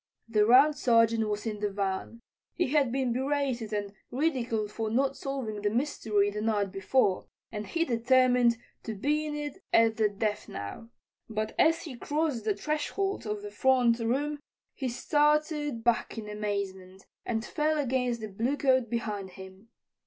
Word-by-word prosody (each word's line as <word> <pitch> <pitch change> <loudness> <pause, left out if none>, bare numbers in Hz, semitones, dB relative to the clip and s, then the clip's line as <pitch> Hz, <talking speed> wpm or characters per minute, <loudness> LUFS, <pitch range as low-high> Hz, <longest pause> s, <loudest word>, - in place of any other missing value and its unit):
The 215 -2 +3
Round 275 +5 +7
Sergeant 230 -3 +3
was 210 +1 -3
in 215 -2 -3
the 205 0 0
van. 200 +3 -3 0.3
He 350 - 0
had 280 -4 +2
been 260 -2 0
berated 265 -4 -1
and 205 -1 -3 0.2
ridiculed 245 -7 -1
for 220 0 -3
not 270 +4 +1
solving 255 -7 -4
the 205 - +1
mystery 215 -4 0
the 210 +1 -4
night 210 -3 0
before, 195 0 +1 0.2
and 210 -1 -5
he 335 -1 0
determined 245 -1 +3 0.2
to 220 - -5
be 300 +8 0
in 295 -1 -4 0.2
at 225 -1 +4
the 215 -2 +3
death 210 +1 -2
now. 100 - -7 0.4
But 215 0 -2
as 325 +1 +4
he 275 -7 -8
crossed 290 -4 -1
the 210 -2 +1
threshold 305 - -2
of 210 -1 -3
the 205 - -6
front 245 +1 +3
room 280 +6 -1 0.3
he 265 -2 -3
started 295 -1 +1
back 235 0 +1
in 215 -2 -5
amazement 200 -3 -4 0.2
and 225 -1 -2
fell 310 0 0
against 250 -4 0
the 215 - -4
bluecoat 255 +3 +1
behind 210 -4 -3
him. 190 +3 -12
230 Hz, 160 wpm, -29 LUFS, 210-275 Hz, 0.4 s, Round